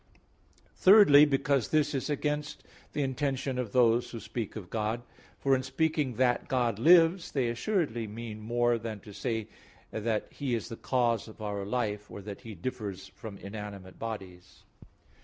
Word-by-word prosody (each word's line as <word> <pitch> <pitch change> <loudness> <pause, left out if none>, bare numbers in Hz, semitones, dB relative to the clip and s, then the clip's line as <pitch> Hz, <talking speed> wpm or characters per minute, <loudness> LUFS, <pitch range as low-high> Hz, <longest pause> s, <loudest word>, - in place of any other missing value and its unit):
Thirdly, 185 -8 +8
because 140 -2 +1
this 150 -1 +2
is 135 +2 -2
against 150 +1 -2 0.3
the 145 - 0
intention 135 -1 -1
of 120 -5 -3
those 120 0 +3
who 115 - -6
speak 110 0 -5
of 100 -5 -8
God. 110 +2 -1 0.3
For 135 -1 +3
in 130 - 0
saying 140 0 0
that 125 0 +2
God 120 -5 0
lives, 165 +5 +5
they 130 -4 +1
assuredly 120 - -1
mean 110 0 -7
more 120 +2 +1
than 110 -1 -5
to 105 - -12
say 110 0 -2 0.4
the 110 0 -1
He 135 -4 -2
is 115 - -4
the 115 - -5
cause 120 -3 0
of 110 - -13
our 100 -2 -3
life, 105 -3 -2
or - - -8
that 100 0 -8
He 110 -2 -9
differs 105 0 -5
from 105 -3 -9
inanimate 100 -2 -8
bodies. 95 -5 -7
120 Hz, 160 wpm, -30 LUFS, 105-135 Hz, 0.4 s, Thirdly